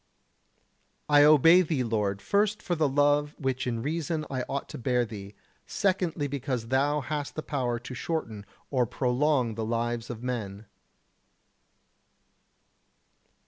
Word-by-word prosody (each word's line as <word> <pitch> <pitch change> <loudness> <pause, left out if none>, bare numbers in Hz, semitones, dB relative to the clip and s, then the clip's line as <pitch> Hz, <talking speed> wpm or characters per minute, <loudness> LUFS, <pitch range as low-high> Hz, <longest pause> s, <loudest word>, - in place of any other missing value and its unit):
I 145 -1 +6
obey 160 +4 +7
Thee, 155 -7 -1
Lord, 105 -4 -1
first 210 +1 +1
for 175 - -1
the 155 -4 +1
love 145 +1 +2
which 130 -2 -2
in 115 -2 -2
reason 155 +1 -2
I 130 -1 -1
ought 140 - -3
to - - -7
bear 125 0 +1
Thee; 100 -2 -9 0.3
secondly 180 -6 0
because 130 -4 -3
Thou 145 +3 +2
hast 145 0 -4
the 155 - -4
power 125 -5 -1
to 125 - -8
shorten 115 -7 -4 0.2
or 125 -4 +2
prolong 125 0 +1
the 110 +1 -4
lives 115 +1 -2
of 120 -1 -7
men. 110 -5 -4
130 Hz, 135 wpm, -28 LUFS, 120-150 Hz, 0.3 s, obey